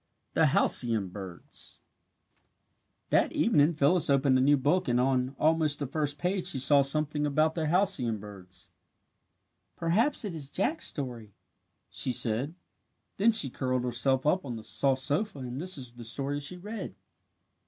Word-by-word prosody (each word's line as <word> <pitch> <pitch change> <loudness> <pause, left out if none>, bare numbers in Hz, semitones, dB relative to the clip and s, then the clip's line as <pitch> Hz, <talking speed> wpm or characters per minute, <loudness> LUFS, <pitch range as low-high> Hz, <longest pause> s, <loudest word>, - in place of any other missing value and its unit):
THE - - +4
HALCYON 110 -6 +2
BIRDS 95 -2 -11 1.3
That - - +3
evening 150 +3 +3
Phyllis 155 +3 +2
opened 135 -1 +3
a 130 - +3
new 145 +2 +4
book 155 +8 +1
and 120 0 +1
on 130 +1 0
almost 155 -2 +2
the 145 - -3
first 145 +1 -3
page 180 +1 -1
she - - +1
saw 140 +2 +4
something 150 +1 0
about 155 +2 +1
the 160 -2 -2
halcyon 165 - +1
birds. 95 -3 -13 1.0
"Perhaps 215 - 0
it 200 - -4
is 145 -4 -6
Jack's 290 - -1
story," 120 -8 -6 0.6
she 130 - -1
said. 125 +6 0 0.6
Then 220 +4 +4
she 180 - +3
curled 130 -1 -2
herself 125 +2 0
up 180 +5 +2
on 125 -4 -6
the 110 - -8
soft 130 +2 0
sofa 155 +5 -1
and 130 +1 -6
this 185 0 -1
is 125 -3 -7
the 120 0 -11
story 140 +5 -2
she 145 +6 -3
read. 210 +5 -7
140 Hz, 155 wpm, -28 LUFS, 125-160 Hz, 1.3 s, THE